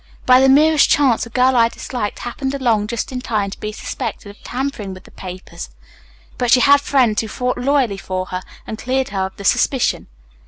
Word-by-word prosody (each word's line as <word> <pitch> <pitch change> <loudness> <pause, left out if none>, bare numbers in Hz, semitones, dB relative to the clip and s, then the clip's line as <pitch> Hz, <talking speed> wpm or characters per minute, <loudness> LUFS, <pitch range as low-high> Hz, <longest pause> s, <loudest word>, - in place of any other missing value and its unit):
By 255 0 +6
the 265 - +5
merest 305 +2 +5
chance 265 -6 +3
the - - -11
girl 255 +2 +2
I 230 -1 +4
disliked 230 -3 -5
happened 265 +3 -4
along 230 -6 +1
just 235 +2 -4
in 250 -1 -4
time 210 -5 -2
to - - -9
be 215 - -4
suspected 215 -1 -6
of 205 - -20
tampering 245 -7 -4
with 185 - -13
the - - -17
papers. 185 - -9 0.7
But 245 - 0
she 250 - +6
had 285 +1 +6
friends 255 -7 +2
who 220 - -6
fought 250 +3 -2
loyally 255 -5 +1
for 185 -1 -4
her 185 0 -5 0.2
and 220 - -7
cleared 260 +2 -1
her 190 -1 -2
of 190 - -15
the 200 - -8
suspicion. 255 +5 +1
240 Hz, 205 wpm, -19 LUFS, 205-265 Hz, 0.7 s, By